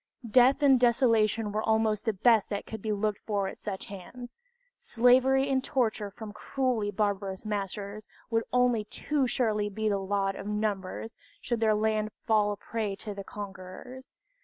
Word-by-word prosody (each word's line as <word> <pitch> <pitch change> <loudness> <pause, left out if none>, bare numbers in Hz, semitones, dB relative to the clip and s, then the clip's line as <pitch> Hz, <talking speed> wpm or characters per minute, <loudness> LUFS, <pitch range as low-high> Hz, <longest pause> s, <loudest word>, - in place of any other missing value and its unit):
Death 255 +5 +5
and 270 -3 +6
desolation 230 -3 +3
were 215 +1 -1
almost 220 -1 +1
the 220 - +1
best 220 +1 +3
that 200 -1 -3
could 220 -2 -7
be 215 - -2
looked 210 0 -1
for 200 -3 0
at - - -6
such 195 -3 -6
hands 240 +6 -10 0.4
slavery 260 +3 +4
and 265 -1 +1
torture 220 -6 0
from 210 +1 -9
cruelly 240 -2 -1
barbarous 200 -1 -2
masters 205 0 -4 0.2
would 225 0 +2
only 250 -3 +3
too 280 +5 -1
surely 215 -4 0
be 220 +2 -2
the 200 -1 0
lot 195 0 -1
of 195 - -7
numbers, 210 0 -3 0.2
should 235 -2 -2
their 220 -1 +3
land 215 0 0 0.2
fall 215 -2 +3
a 205 - -4
prey 215 -2 -3
to 210 +1 -6
the 200 0 -7
conquerors. 200 +7 -9
215 Hz, 165 wpm, -29 LUFS, 205-240 Hz, 0.4 s, and